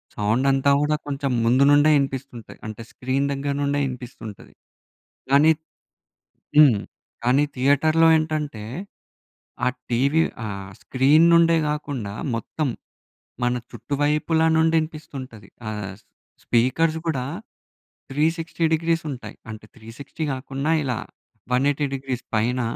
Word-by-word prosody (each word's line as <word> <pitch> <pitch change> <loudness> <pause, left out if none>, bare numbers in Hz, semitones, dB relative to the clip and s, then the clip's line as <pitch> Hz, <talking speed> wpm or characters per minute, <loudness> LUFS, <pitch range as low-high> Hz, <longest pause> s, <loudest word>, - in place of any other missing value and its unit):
Sound 110 +6 +1
అంతా 135 +1 +3
కూడా 150 +1 +2
కొంచెం 140 -1 -2
ముందు 125 +4 +4
నుండే 145 +1 +5
వినిపిస్తుంటాయి. 135 -3 -4
అంటే, 110 +1 -7
స్క్రీన్ 130 +2 -1
దగ్గర 140 0 -2
నుండే 145 0 0
వినిపిస్తుంటది. 125 -5 -8 0.8
కానీ 145 +3 +6 1.1
హ్మ్. 145 -8 +7 0.5
కానీ 130 +4 +3
థియేటర్‌లో 155 +5 +3
ఏంటంటే, 155 -7 -3 1.0
ఆ - - +4 0.2
టీవీ 140 +7 +3 0.2
ఆ - - -3 0.4
స్క్రీన్ 145 +5 +4
నుండే 165 0 +5
కాకుండా, 140 -9 -4 0.2
మొత్తం 145 +6 -3 0.8
మన 120 0 +2 0.2
చుట్టువైపుల 150 +3 0 0.2
నుండి 160 0 +3
వినిపిస్తుంటది. 140 -8 -8 0.2
ఆహ్, 105 -3 -5 0.5
స్పీకర్స్ 155 +7 +2
కూడా 135 -6 -1 0.9
360 165 +3 -1
డిగ్రీస్ 165 +1 0
ఉంటాయి. 115 -6 -8
అంటే 110 -1 -9
360 120 +7 -8
కాకుండా, 135 +3 -2
ఇలా 125 -5 -2 0.5
180 140 +3 +2
డిగ్రీస్ 130 -2 -4
పైన 120 +4 +1
140 Hz, 110 wpm, -23 LUFS, 125-155 Hz, 1.1 s, హ్మ్